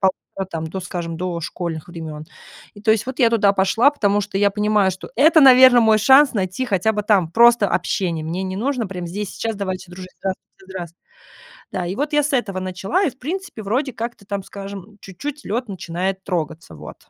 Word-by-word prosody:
1,5 190 0 -2
там 160 -1 -4
до, 190 +4 -5
скажем, 170 -2 -5
дошкольных 170 -2 -4
времен. 160 -3 -8 0.5
И 205 - -13
то 220 - +3
есть 220 +2 +2
вот 260 +2 -6
я 235 -3 +4
туда 205 -3 +3
пошла, 200 +7 +3
потому 205 -8 +1
что 200 -1 -5
я 200 0 +3
понимаю, 210 -1 +2
что 185 - -9
это 315 +5 +6
наверное, 255 -2 +8
мой 220 -1 +4
шанс 265 +6 +6
найти 195 +4 -2
хотя 205 0 +1
бы 210 -1 -2
там 195 -6 +2
просто 235 -1 +5
общение, 170 -4 -1
мне 170 +4 -3
не 190 0 -4
нужно 250 0 -1
прям 180 -2 -6
здесь 195 +2 -5
и - - -11
сейчас 225 -2 -3
"давайте 190 -2 -5
дружить", 185 +1 -10
да, 195 - 0 0.3
здрас - - -17
здраствуйте. 175 -3 -8 0.7
Да, 175 - -3
и 180 - -3
вот 290 +4 -2
я 295 - +4
с 290 +1 -2
этого 220 -8 -1
начала 185 - -1
и 320 - +1
в 260 - -23
принципе, 335 - -5
вроде 255 +7 -1
как 235 +1 -5
то 200 - -20
там, 200 0 -4
скажем, 200 +1 -9
чуть-чуть 285 - -7
лед 235 +3 -3
начинает 190 +1 -3
трогаться, 160 - -4
вот. 75 0 -10
200 Hz, 210 wpm, -20 LUFS, 185-235 Hz, 0.7 s, наверное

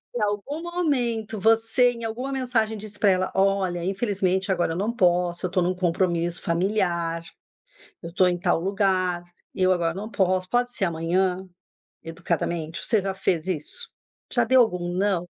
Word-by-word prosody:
em 235 - -1
algum 210 +10 -2
momento 245 - -1
você, 225 +3 +3
em 235 -1 -9
alguma 245 +5 -4
mensagem 240 -5 0
disse 210 0 -9
pra 205 - +4
ela: 185 0 0
"Olha, 190 -3 +1
infelizmente 195 -1 0
agora 175 -3 +1
eu - - -4
não 210 +4 0
posso, 175 -1 +1
eu - - -1
tô 185 - +2
num 180 +1 +1
compromisso 175 -1 0
familiar. 170 -2 0 0.8
Eu 170 - -7
tô 185 +1 +4
em 175 -1 0
tal 175 -2 +1
lugar. 185 -2 0 0.3
Eu 185 -1 +3
agora 165 -2 0
não 210 +4 -6
posso. 185 -2 0
Pode 245 0 +1
ser 195 - 0
amanhã?"? 180 +3 0 0.6
Educadamente, 165 0 -3
você 220 - +3
já 195 -1 -2
fez 180 -3 -1
isso? 455 - -3 0.4
Já - - +3
deu 260 0 +5
algum 180 -5 -2
"não"? 185 -2 0
190 Hz, 165 wpm, -25 LUFS, 175-220 Hz, 0.8 s, deu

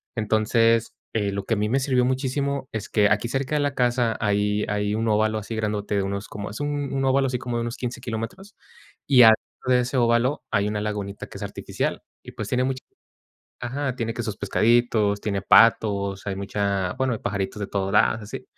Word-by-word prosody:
Entonces, 115 +1 +2 0.2
eh, 105 -3 0
lo 100 0 -3
que 115 - +1
a - - -3
mí 105 +1 0
me 135 - +2
sirvió 130 -2 +2
muchísimo 135 +1 -1
es 110 -2 -4
que 105 -2 +3
aquí 105 +2 +1
cerca 135 +4 -1
de - - +2
la 145 0 0
casa 120 -2 +1
hay 105 0 +1
hay 105 0 0
un 115 +1 -1
óvalo 110 0 +2
así 110 +2 -6
grandote 105 -1 -2
de 100 - +1
unos 100 +1 -4
como 105 0 -6
es 105 - -7
un 145 -2 -2
un 135 0 0
óvalo 135 +1 +3
así 125 -1 -2
como 120 -1 -3
de 115 - -1
unos 120 +2 -4
15 125 -1 -4
kilómetros 120 - -6 0.5
y 130 -3 +7
al 110 - +10 0.3
lado 125 0 +3
de 125 - +4
ese 130 +2 -2
óvalo, 120 +4 +2
hay 100 +1 +2
una 105 0 -2
lagunita 105 -2 -4
que - - -10
es - - -6
artificial - - -3 0.2
y, - - -10
pues, 105 - -5
tiene 125 0 +1
mucha 130 0 -2 0.8
ajá, 130 +2 -2
tiene 115 -2 -2
que 120 - -3
sus 105 -2 -4
pescaditos, 110 -1 +2
tiene 100 -2 -2
patos, 100 -2 +4
hay 100 - -1
mucha 100 -2 -1
bueno, 130 -1 0
hay - - -7
pajaritos 100 +1 -3
de 100 - -3
todos 95 -1 -2
lados, 110 +1 +3
así. 105 - -7
110 Hz, 215 wpm, -24 LUFS, 105-125 Hz, 0.8 s, al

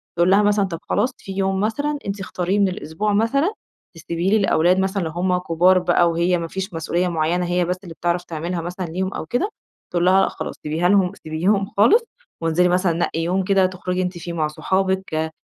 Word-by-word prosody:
تقول 175 +1 +3
لها 200 +2 +5
مثلًا 205 -1 +3
طب 170 -4 -5
خلاص 225 +6 +2
في 195 - -9
يوم 190 0 0
مثلًا 285 +8 -1
أنت 200 +1 -3
اختاريه 190 +1 -1
من 200 - +4
الأسبوع 185 +4 -2
مثلًا 275 - +2 0.4
تسيبي 170 +3 -2
لي 220 - +4
الأولاد 180 -2 +3
مثلًا 190 +1 0
لو 160 - -3
همّ 180 +2 0
كبار 180 +1 +3
بقى، 175 -1 +3
وهي 175 +2 +1
ما 165 -1 -4
فيش 190 +1 -5
مسؤوليّة 170 +2 -1
معيّنة 170 +1 0
هي 175 0 +1
بس 180 +1 -2
اللي 170 - -9
بتعرف 175 +2 -1
تعملها 170 +1 -4
مثلًا 180 +2 -5
ليهم، 185 +4 -3
أو - - -5
كده. 245 - -1 0.4
تقول 175 0 +1
لها 190 +1 +5
لأ - - +2
خلاص - - -6
سيبيها 160 +4 0
لهم 195 -2 +3
سيبيهم 185 +6 +1
خالص 420 - +5 0.4
وانزلي 165 +2 +2
مثلًا 180 -1 +2
نقي 165 -1 -1
يوم 180 +3 0
كده 195 0 +3
تخرجي 185 0 -2
أنتِ 180 -1 -3
فيه 170 0 -6
مع 155 -2 0
صحابك، 190 -1 -1
180 Hz, 205 wpm, -21 LUFS, 170-195 Hz, 0.4 s, لها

